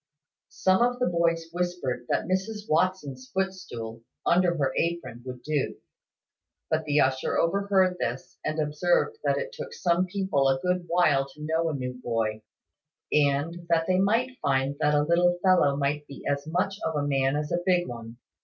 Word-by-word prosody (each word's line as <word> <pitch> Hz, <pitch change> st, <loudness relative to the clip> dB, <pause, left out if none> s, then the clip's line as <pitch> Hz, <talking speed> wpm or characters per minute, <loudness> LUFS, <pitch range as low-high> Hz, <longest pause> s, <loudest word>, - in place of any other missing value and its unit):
Some 190 Hz, +2 st, +2 dB
of 245 Hz, +1 st, +2 dB
the 250 Hz, -, +1 dB
boys 170 Hz, -2 st, +1 dB
whispered 175 Hz, -9 st, -2 dB
that -, -, +1 dB
Mrs 205 Hz, +4 st, -2 dB
Watson's 155 Hz, -6 st, 0 dB
footstool, 120 Hz, -13 st, -4 dB, 0.2 s
under 175 Hz, -1 st, +3 dB
her 135 Hz, -3 st, 0 dB
apron, 150 Hz, -9 st, -2 dB
would 125 Hz, -1 st, -7 dB
do: 150 Hz, -3 st, -1 dB, 1.0 s
but 160 Hz, 0 st, +1 dB
the 150 Hz, 0 st, +2 dB
usher 130 Hz, 0 st, +1 dB
overheard 190 Hz, +1 st, +2 dB
this, 120 Hz, +3 st, -4 dB
and 155 Hz, +1 st, -2 dB
observed 175 Hz, -, +1 dB
that -, -, +2 dB
it -, -, -3 dB
took 485 Hz, -1 st, -7 dB
some 175 Hz, -, +1 dB
people 190 Hz, -8 st, +1 dB
a 135 Hz, 0 st, +2 dB
good 180 Hz, +2 st, -1 dB
while 155 Hz, -6 st, +3 dB
to 150 Hz, -, -10 dB
know 160 Hz, +1 st, +1 dB
a 155 Hz, -, -2 dB
new 125 Hz, -2 st, -3 dB
boy; 110 Hz, -2 st, -1 dB, 0.7 s
and 150 Hz, +4 st, +1 dB
that 165 Hz, -1 st, +3 dB
they 185 Hz, +1 st, +2 dB
might 230 Hz, +6 st, +1 dB
find 135 Hz, 0 st, +1 dB
that 150 Hz, -1 st, +3 dB
a 145 Hz, -, +3 dB
little 175 Hz, +3 st, +3 dB
fellow 180 Hz, -7 st, +4 dB
might 145 Hz, +1 st, -1 dB
be 140 Hz, -, -10 dB
as 140 Hz, +1 st, -1 dB
much 185 Hz, +4 st, -1 dB
of 160 Hz, -, -1 dB
a 145 Hz, -1 st, 0 dB
man 135 Hz, 0 st, +1 dB
as 150 Hz, 0 st, -2 dB
a 175 Hz, -, +1 dB
big 180 Hz, -1 st, +2 dB
one. 115 Hz, -1 st, -8 dB
165 Hz, 175 wpm, -27 LUFS, 140-185 Hz, 1.0 s, fellow